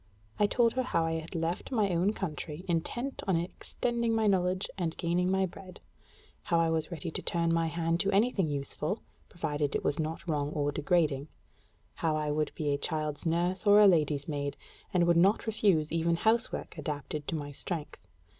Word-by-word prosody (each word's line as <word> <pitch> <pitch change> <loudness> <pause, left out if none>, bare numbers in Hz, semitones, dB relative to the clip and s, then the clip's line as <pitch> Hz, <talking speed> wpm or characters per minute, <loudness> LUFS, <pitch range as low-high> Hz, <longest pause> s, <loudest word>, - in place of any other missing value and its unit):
I 205 - +5
told 230 +2 +3
her 255 - +1
how 170 -10 0
I 165 0 -1
had 160 +3 -9
left 165 +7 -2
my 215 -6 +2
own 180 +5 +2
country, 165 -3 -5
intent 240 +11 -2
on 190 - +3
extending 230 +7 -1
my 220 -1 +2
knowledge 185 -1 +2
and 170 -4 -2
gaining 175 +1 +1
my 190 0 +2
bread; 185 0 -10 0.7
how 170 - +2
I 165 -1 +2
was 160 -1 -1
ready 170 -1 -5
to - - -3
turn 170 -1 0
my 165 0 +2
hand 165 +1 0
to 195 +1 +1
any 215 +5 +3
useful 150 0 -1
thing, - - -25 0.3
provided 150 -5 -2
it - - -1
was 145 - +1
not 160 +3 -3
wrong 145 -3 0
or 145 -1 0
degrading: 150 -2 +1 0.7
how 160 -2 0
I 150 -1 -1
would 150 0 0
be 145 -2 0
a 140 - -1
child's 155 -1 -2
nurse 175 +5 0
or 205 +1 +8
a 210 - +8
lady's 150 -6 +3
maid, 145 -2 -3 0.3
and 175 -2 +3
would 170 0 +4
not 195 +5 +4
refuse 200 -8 +2
even 165 +1 +1
housework 225 +6 0
adapted 150 -1 -4
to - - -1
my 145 -2 -4
strength. 155 +2 -6
170 Hz, 190 wpm, -30 LUFS, 155-190 Hz, 0.7 s, or